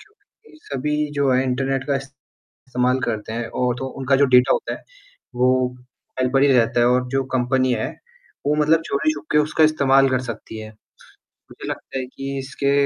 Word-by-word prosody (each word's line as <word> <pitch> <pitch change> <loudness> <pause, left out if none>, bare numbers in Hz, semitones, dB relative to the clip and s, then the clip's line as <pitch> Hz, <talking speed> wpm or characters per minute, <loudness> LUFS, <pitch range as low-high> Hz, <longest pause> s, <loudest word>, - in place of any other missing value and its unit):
क्योंकि 435 -5 -22
सभी 150 +2 -2
जो 140 -1 +2
है 130 +1 +3
इंटरनेट 135 +1 -1
का 140 -1 +1
इस्तेमाल 130 -1 -4
करते 110 -2 -3
हैं 115 0 -3
और 125 +1 0
तो 135 - -4
उनका 135 +1 0
जो 140 - +4
डाटा 125 - +5
होता 470 - -1
है - - -12 0.5
वो 125 0 +2 0.4
फाइल 130 0 +2
पे - - +5
ही 140 - +4
रहता 120 -1 +3
है 120 - +4
और 125 +1 +2
जो 135 +2 0
कंपनी 130 +1 +1
है 110 -2 -1 0.6
वो 145 - +3
मतलब 155 +2 +3
चोरी 140 +2 +1
छुप 145 - -8
के 150 - +5
उसका 155 +1 +3
इस्तेमाल 135 -3 +4
कर 130 -1 +1
सकती 115 -2 -7
है। 110 0 -7 0.8
मुझे - - -9
लगता 135 - -6
है 130 - -3
कि 135 +2 -6
इसके 140 +1 -2
135 Hz, 190 wpm, -21 LUFS, 125-140 Hz, 0.8 s, डाटा